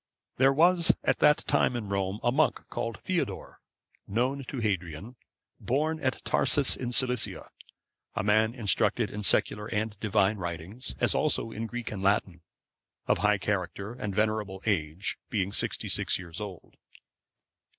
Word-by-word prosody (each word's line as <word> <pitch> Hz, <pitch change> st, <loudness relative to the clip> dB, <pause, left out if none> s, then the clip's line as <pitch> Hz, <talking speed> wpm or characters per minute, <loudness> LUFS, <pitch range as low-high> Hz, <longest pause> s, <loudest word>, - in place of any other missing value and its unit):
There 135 Hz, +1 st, +5 dB
was 170 Hz, +4 st, +4 dB
at -, -, +1 dB
that 150 Hz, 0 st, +4 dB
time 125 Hz, -, +2 dB
in 115 Hz, -4 st, -4 dB
Rome, 100 Hz, +1 st, -1 dB
a 120 Hz, -, +3 dB
monk, 150 Hz, +4 st, +2 dB
called 115 Hz, -1 st, -4 dB
Theodore,(524) 185 Hz, -2 st, -3 dB, 0.6 s
known 130 Hz, +4 st, 0 dB
to 135 Hz, -, -6 dB
Hadrian, 100 Hz, -1 st, -3 dB, 0.4 s
born 155 Hz, +6 st, 0 dB
at 130 Hz, -3 st, -2 dB
Tarsus 140 Hz, -2 st, +4 dB
in 125 Hz, -1 st, -4 dB
Cilicia, 125 Hz, -2 st, +1 dB, 0.6 s
a -, -, -1 dB
man 110 Hz, +3 st, +3 dB
instructed 110 Hz, -6 st, +1 dB
in 105 Hz, -, -5 dB
secular 105 Hz, +1 st, +1 dB
and 110 Hz, -1 st, -3 dB
Divine 105 Hz, -1 st, +2 dB
writings, 85 Hz, +7 st, -5 dB
as -, -, +4 dB
also 140 Hz, -6 st, 0 dB
in 115 Hz, +1 st, -4 dB
Greek 120 Hz, 0 st, -5 dB
and 100 Hz, -3 st, -5 dB
Latin; 95 Hz, -3 st, +1 dB, 0.6 s
of -, -, +2 dB
high 105 Hz, 0 st, +3 dB
character 100 Hz, +2 st, -3 dB
and 105 Hz, -6 st, -5 dB
venerable 105 Hz, -3 st, -1 dB
age, 85 Hz, -3 st, -1 dB
being 100 Hz, -2 st, -1 dB
sixty -, -, -1 dB
six -, -, +1 dB
years 90 Hz, +1 st, -9 dB
old. 100 Hz, -4 st, -9 dB
110 Hz, 150 wpm, -28 LUFS, 100-125 Hz, 0.6 s, There